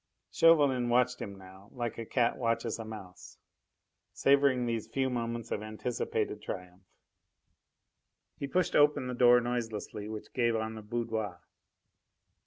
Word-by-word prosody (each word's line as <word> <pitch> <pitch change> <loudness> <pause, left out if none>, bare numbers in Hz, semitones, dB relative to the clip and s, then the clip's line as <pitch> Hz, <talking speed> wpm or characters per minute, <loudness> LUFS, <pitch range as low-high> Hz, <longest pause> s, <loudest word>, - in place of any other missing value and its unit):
Chauvelin 145 -7 +4
watched 125 +1 +2
him 100 -1 -6
now 95 +1 -14
like 120 -3 -4
a 115 - -5
cat 120 -2 +2
watches 115 -1 -1
a - - -4
mouse, 100 -5 -10 0.8
savouring 140 -2 +3
these 115 -2 -2
few 130 +3 -1
moments 115 -1 -3
of 105 - -1
anticipated 110 +3 -3
triumph. 90 0 -7 1.6
He 140 - -3
pushed 180 +3 0
open 145 -3 +4
the 125 - -3
door 125 0 +6
noiselessly 115 -3 -4
which 110 -1 -8
gave 120 -2 +2
on 110 0 -2
the 110 - -8
boudoir. 110 -4 -3
115 Hz, 135 wpm, -31 LUFS, 110-125 Hz, 1.6 s, door